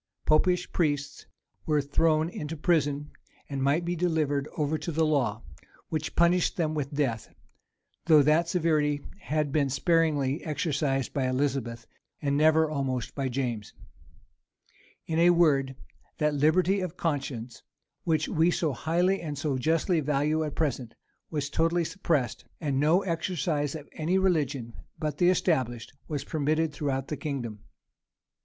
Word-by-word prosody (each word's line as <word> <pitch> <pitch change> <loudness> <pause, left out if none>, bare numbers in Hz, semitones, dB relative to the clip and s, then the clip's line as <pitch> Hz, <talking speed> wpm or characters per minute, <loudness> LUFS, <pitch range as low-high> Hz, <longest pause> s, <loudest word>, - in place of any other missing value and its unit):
Popish 180 +4 +2
priests 145 -4 -1 0.4
were 150 -1 +3
thrown 155 +2 +2
into 160 -2 -6
prison, 145 -3 0 0.4
and 140 -2 -4
might 145 +5 +2
be 175 +1 -1
delivered 155 -5 0
over 150 0 0
to 170 - -4
the 160 +1 +2
law, 125 -8 0 0.5
which 155 -1 -3
punished 175 +1 +3
them 160 -3 0
with 145 -3 -3
death; 135 -7 -2 0.8
though 155 -3 +7
that 155 +4 +3
severity 155 -4 +1 0.2
had 150 -5 -1
been 140 -2 +1
sparingly 145 -1 +1
exercised 145 -3 -1
by 135 -2 0
Elizabeth, 130 -3 -1 0.3
and 140 -2 0
never 155 +2 +4
almost 135 -5 -2
by 135 -2 -2
James. 120 -5 -3 1.3
In 160 0 -1
a 170 +1 +6
word, 145 -6 +3 0.4
that 150 -1 +1
liberty 175 +7 +3
of 180 -1 -4
conscience, 135 -7 -3 0.4
which 155 -2 +1
we 165 +2 +2
so 160 -4 0
highly 175 +8 +1
and 150 -3 -5
so 145 -1 -1
justly 160 +5 +1
value 150 +2 +1
at 150 -2 -4
present, 130 -7 -2 0.3
was 145 -3 -2
totally 165 +3 +1
suppressed; 155 - -1 0.2
and 140 -5 -1
no 160 +7 +3
exercise 165 -4 -1
of 150 -2 -8
any 165 +4 0
religion 145 -10 0 0.2
but 155 -1 -3
the 175 -1 +5
established, 130 -12 0
was 145 -3 -3
permitted 155 +1 0
throughout 135 -2 -2
the 150 - -4
kingdom. 130 -7 -4
150 Hz, 140 wpm, -28 LUFS, 140-165 Hz, 1.3 s, though